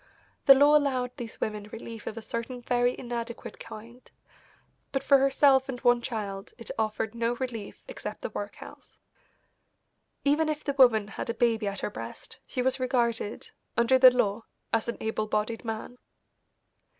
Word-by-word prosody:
The 275 - +11
law 290 +2 +6
allowed 260 -4 +1
these 235 -2 -7
women 210 -1 -3
relief 225 -1 -8
of 215 - -5
a 225 - -6
certain 240 +2 -5
very 245 0 +1
inadequate 235 -1 -6
kind, 235 +4 -11 0.8
but 270 -1 -1
for 275 0 +6
herself 270 0 +4
and 250 -2 -4
one 245 0 +4
child 205 -5 -5
it 230 - -7
offered 220 0 -1
no 235 +1 0
relief 235 -5 -6
except - - -7
the - - -3
workhouse. - - -8 1.3
Even 305 +2 +3
if 305 0 -3
the 280 - -1
woman 240 -6 +5
had 210 - -6
a 230 - -1
baby 230 -3 +1
at 200 0 -3
her - - -2
breast - - -9
she 255 - -2
was 260 +1 +1
regarded, 235 -4 -1 0.3
under 235 +3 +4
the 255 0 +10
law, 225 -3 0 0.3
as 225 0 +1
an 235 - -3
able 220 -1 -2
bodied 215 +3 -1
man. 225 +2 -5
240 Hz, 160 wpm, -28 LUFS, 225-260 Hz, 1.3 s, The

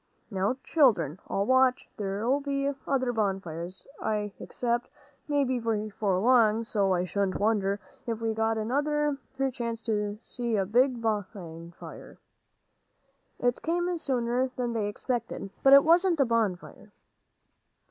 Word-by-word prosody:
"Now, 200 +6 0
children, 190 - +3
I'll 195 - 0
watch; 260 +1 +3
there'll 210 +7 0
be 280 0 -1 0.2
other 260 -3 +1
bonfires, 190 -4 -3 0.2
I 210 -2 -1
expect. 240 0 -2 0.4
Maybe 275 -4 +1
before 215 -3 -1
long; 225 0 +4
so 205 -4 0
I 180 -1 +2
shouldn't 195 +1 -1
wonder 205 -2 +1 0.3
if 225 -2 -2
we 225 -1 -1
got 225 0 0
another 290 +5 0 0.4
chance 235 -2 -4
to 210 -2 -1
see 235 0 -3
a 195 -2 +1
big 245 +3 +2
fire." 180 -6 -5 1.2
It 245 0 0
came 350 +2 0
sooner 250 -2 0
than 240 -2 -2
they 215 -3 -1
expected, 235 -2 -4
but 270 - +5
it 275 - +9
wasn't 340 +1 +4
a 275 - +5
bonfire. 215 -3 -2
225 Hz, 125 wpm, -28 LUFS, 205-260 Hz, 1.2 s, it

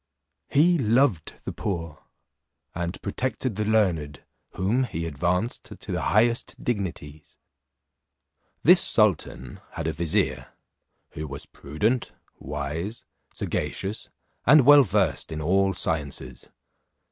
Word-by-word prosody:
He 170 +4 +4
loved 115 - +2
the - - -4
poor, 85 -6 -5 0.7
and 85 +1 -4
protected 125 +2 -2
the 105 +1 -1
learned, 85 -10 0 0.3
whom 105 +8 +1
he 85 -8 -4
advanced 90 - -1
to - - -9
the - - -1
highest 115 +3 +1
dignities. 85 - -4 1.3
This 175 +3 +7
sultan 90 - +1
had 80 - -5
a 80 - -1
vizier, 80 0 -1 0.6
who 75 +1 -6
was 70 0 -7
prudent, 105 - -2 0.3
wise, 75 - -5 0.3
sagacious, 100 +3 -3 0.3
and 145 0 +6
well 145 +1 +9
versed 95 - 0
in 80 - -4
all 95 +5 +2
sciences. 70 -6 -3
95 Hz, 110 wpm, -25 LUFS, 75-115 Hz, 1.3 s, well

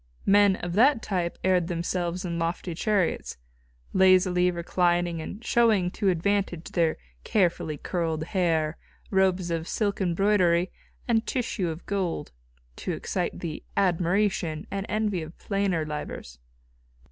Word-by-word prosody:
Men 200 -1 +5
of 175 -2 -5
that 240 +4 +4
type 175 -3 -2
aired 180 -2 +2
themselves 175 +1 -2
in 170 -1 -3
lofty 170 +1 -2
chariots, 190 - 0 0.6
lazily 185 -1 +4
reclining 175 -1 0
and 205 +8 -8
showing 215 -7 +3
to 200 0 0
advantage 185 -1 -1
their 165 -2 +1 0.3
carefully 170 -6 +1
curled 160 -1 -2
hair, 165 -3 0 0.3
robes 190 -2 +2
of 165 0 -2
silk 205 -2 -1
embroidery 180 -1 +2 0.4
and 225 -2 +1
tissue 230 -8 -1
of 160 +2 -7
gold, 190 -4 -2 0.5
to - - -3
excite - - -3
the 160 -3 -5
admiration 180 -2 +1
and 195 0 -3
envy 210 -4 0
of 160 +1 -9
plainer 195 -5 -1
livers. 150 - -6
180 Hz, 125 wpm, -26 LUFS, 170-200 Hz, 0.6 s, Men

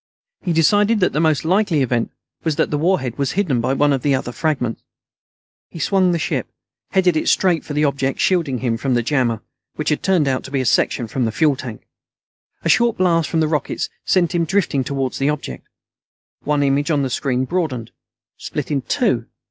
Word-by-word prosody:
He 180 - -1
decided 205 +7 +3
that 180 - +2
the 150 - 0
most 160 -1 +2
likely 180 -4 +2
event 120 -2 0 0.3
was 160 -3 0
that 160 - 0
the 150 - +1
warhead 150 -8 0
was 140 - 0
hidden 160 -12 +1
by 130 +3 0
one 145 +1 +3
of 135 - -1
the 140 0 +2
other 130 -2 -3
fragments. 135 -5 -2 0.9
He - - -11
swung 185 +2 +2
the 170 - +1
ship; 160 - -2 0.4
headed 185 -3 +2
it 155 - +1
straight 180 -4 +2
for 150 - -6
the 150 +1 +2
object 135 -1 -1
shielding 165 -8 +1
him 120 -3 0
from 130 +1 0
the 120 - +1
jammer, 120 -4 0 0.3
which 155 - -2
had 150 - 0
turned 180 -7 +2
out 130 -1 0
to - - -8
be 135 0 -1
a 130 - -1
section 120 0 +1
from 125 +2 -1
the 110 - -1
fuel 150 +4 +2
tank. 120 -4 -8 0.8
A - - -1
short 235 0 +3
blast 170 -3 +2
from 160 - +1
the 155 - +2
rockets 150 -3 -2
sent 180 -2 +2
him 170 -1 +2
drifting 165 -7 +1
toward 135 -1 -2
the 140 +1 0
object. 140 - -5 0.7
One 145 0 +1
image 140 +2 +1
on 145 -3 +2
the 135 - -1
screen 130 0 0
broadened; 130 -8 -2 0.5
split - - -5
in 140 -2 +1
two. 120 - 0
145 Hz, 205 wpm, -20 LUFS, 130-170 Hz, 0.9 s, decided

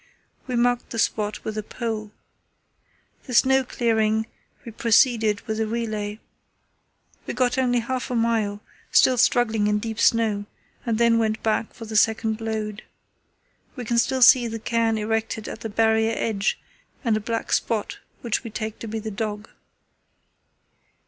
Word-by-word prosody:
We 250 - -2
marked 245 0 +1
the 230 - -6
spot 210 -1 -1
with 215 0 -3
a - - -2
pole. 215 -1 -5 1.1
The 250 - -4
snow 265 +2 +5
clearing, 220 -3 +1 0.4
we 230 - -7
proceeded 225 -2 +3
with 220 -1 -4
a 220 - 0
relay. 215 -2 -3 1.1
We - - -4
got 250 0 +1
only 245 -2 +2
half 255 +2 -3
a 250 - -2
mile, 225 -3 0 0.3
still 255 -2 +5
struggling 225 -3 +3
in 210 0 +2
deep 220 +1 -4
snow, 215 -3 +2 0.4
and 225 -2 +1
then 235 0 +4
went 220 -1 -1
back 220 0 -1
for 225 - -8
the 220 0 -7
second 220 +1 +2
load. 215 -1 -3 0.9
We 250 -3 -6
can 235 +1 +1
still 260 +1 +2
see 240 0 +7
the 225 0 -4
cairn 225 0 0
erected 220 0 -2
at - - -7
the 225 - -4
Barrier 220 +1 +2
edge 210 -2 -1 0.4
and 230 -4 +2
a - - 0
black 225 +1 -3
spot 220 -3 -1 0.2
which 235 +1 -1
we 230 - -6
take 220 0 -5
to 230 - -7
be 220 +1 -4
the 220 0 -5
dog. 210 0 -4
225 Hz, 160 wpm, -24 LUFS, 215-235 Hz, 1.1 s, see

